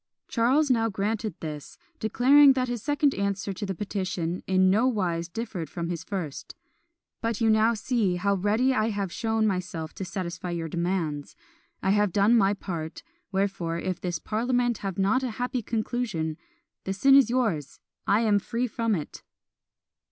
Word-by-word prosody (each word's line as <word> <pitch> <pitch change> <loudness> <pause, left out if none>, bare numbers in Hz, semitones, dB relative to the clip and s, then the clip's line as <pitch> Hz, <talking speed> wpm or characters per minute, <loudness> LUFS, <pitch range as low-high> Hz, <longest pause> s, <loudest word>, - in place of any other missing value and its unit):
Charles 265 +5 +2
now 225 -2 +2
granted 210 -1 -2
this; 150 -2 -7 0.2
declaring 270 +6 +6
that 255 -1 0
his 240 -2 -3
second 290 +1 +2
answer 200 0 -2
to 205 +2 -5
the 190 - -3
petition 185 -3 -3
in 185 0 +4
nowise 195 -7 +1
differed 205 -6 -5
from 170 +2 -4
his 170 -2 -4
first; 165 -6 -5 0.7
"but 230 -2 -1
you 225 -2 +3
now 220 +2 +4
see 215 -4 0
how 200 +3 +1
ready 215 +7 +2
I 220 -2 +1
have 200 -4 -2
shown 220 +1 0
myself 180 -5 -2
to - - -6
satisfy 180 -1 -5
your 170 -1 -3
demands; 170 -4 -2 0.5
I 190 - +3
have 205 -1 +3
done 205 +5 +4
my 205 -2 +4
part; 165 -5 -6 0.3
wherefore, 190 -4 -1
if 185 +1 -3
this 175 -2 -2
parliament 240 +5 0
have 195 -3 -4
not 200 +7 +2
a 260 - -2
happy 250 0 -1
conclusion, 215 -8 -2 0.5
the 190 - -2
sin 270 +8 +4
is 275 -4 +7
yours, 215 - -1 0.3
I 205 +3 +4
am 210 -3 +3
free 235 +5 -2
from 230 -2 0
it!" 155 -4 -6
200 Hz, 165 wpm, -27 LUFS, 180-230 Hz, 0.7 s, is